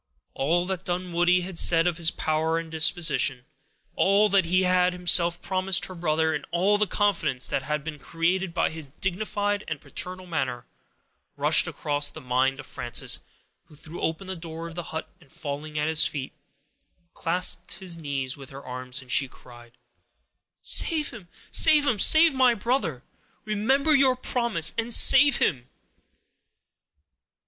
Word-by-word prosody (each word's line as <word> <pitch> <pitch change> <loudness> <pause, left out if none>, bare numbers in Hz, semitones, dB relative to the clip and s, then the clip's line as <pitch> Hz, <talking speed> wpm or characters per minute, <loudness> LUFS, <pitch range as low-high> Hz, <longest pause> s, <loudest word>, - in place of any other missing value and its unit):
All 170 +6 0
that 185 -1 -4
Dunwoodie 180 0 0
had 180 -1 -2
said 165 -1 +5
of 175 -2 -1
his 170 -2 +2
power 160 +1 -1
and 165 -1 -6
disposition, 160 -5 +1 0.5
all 200 +2 +3
that 195 -3 +3
he 185 +3 +1
had 180 0 +2
himself 175 -1 +2
promised 190 0 +1
her 185 - -7
brother, 160 -2 -1
and 150 -1 -4
all 190 +5 +1
the 210 - +1
confidence 195 -11 0
that - - -2
had 150 +2 -4
been 155 -2 -7
created 175 +4 -2
by - - -1
his 160 -3 -7
dignified 205 +5 -3
and 160 -2 -5
paternal 185 +4 -5
manner, 130 -8 -4 0.7
rushed - - +3
across 145 -1 -3
the - - -10
mind 130 +2 -1
of 145 - -9
Frances, 120 -3 -1 0.5
who 150 - -18
threw 155 +3 -10
open 165 +4 -3
the 190 0 -6
door 165 -1 -8
of 165 - -10
the 175 - -5
hut, 160 0 -5
and 145 -5 -22
falling 150 +1 -7
at 150 0 -1
his 160 0 +2
feet, 135 -3 -3 0.8
clasped 175 +1 0
his 185 -3 -3
knees 140 -5 -4
with 135 -2 -12
her 140 0 -12
arms, 125 +1 -4
as 125 - -12
she 135 - +3
cried,— 120 -1 -16 0.9
"Save 310 -3 +2
him—save 285 - +2
him—save 315 +6 +5
my 255 -2 +3
brother; 205 - -2 0.4
remember 265 +9 +1
your 265 -2 +4
promise, 235 -10 -1
and 230 +1 -3
save 280 +1 +6
him!" 125 -6 -1
170 Hz, 155 wpm, -25 LUFS, 150-195 Hz, 0.9 s, save